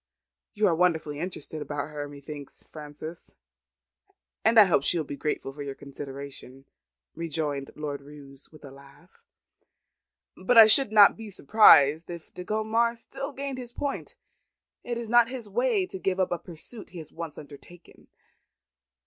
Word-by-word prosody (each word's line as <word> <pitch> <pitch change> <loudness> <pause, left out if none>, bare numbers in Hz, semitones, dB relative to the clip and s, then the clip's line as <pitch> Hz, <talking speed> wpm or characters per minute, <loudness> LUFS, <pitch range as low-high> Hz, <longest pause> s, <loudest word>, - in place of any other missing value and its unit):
"You 210 0 +2
are 180 - +4
wonderfully 160 -4 0
interested 160 -3 -6
about 145 0 -4
her, 145 -1 -6
methinks, 145 0 -9
Frances; 155 +2 -10 1.1
and 225 +1 +5
I - - +11
hope 170 -7 +2
she 170 - +1
will 160 - -2
be 140 - -6
grateful 140 -2 -3
for 145 - -9
your 140 -1 -5
consideration," 140 -1 -9 0.5
rejoined 150 -4 -3
Lord 145 -2 -5
Roos, 140 -1 -14
with 155 -2 -15
a 140 - -11
laugh. 140 +6 -18 1.1
"But 230 +6 +1
I 225 - +12
should 220 +2 +6
not 210 -2 +7
be 220 -1 -9
surprised 160 -5 +5
if 170 -2 -9
De 180 - -7
Gondomar 220 +4 0
still 275 +4 -7
gained 275 -1 -5
his 240 -1 -8
point. 280 -1 -4 0.7
It 240 -1 -4
is 235 -1 -5
not 235 0 +4
his 250 -4 -6
way 220 -2 +1
to 190 - -8
give 190 0 -1
up 185 - +1
a 175 - -1
pursuit 180 +6 -9
he 180 - -12
has 160 -2 -9
once 165 -3 -7
undertaken. 155 +4 -14
165 Hz, 160 wpm, -27 LUFS, 145-215 Hz, 1.1 s, I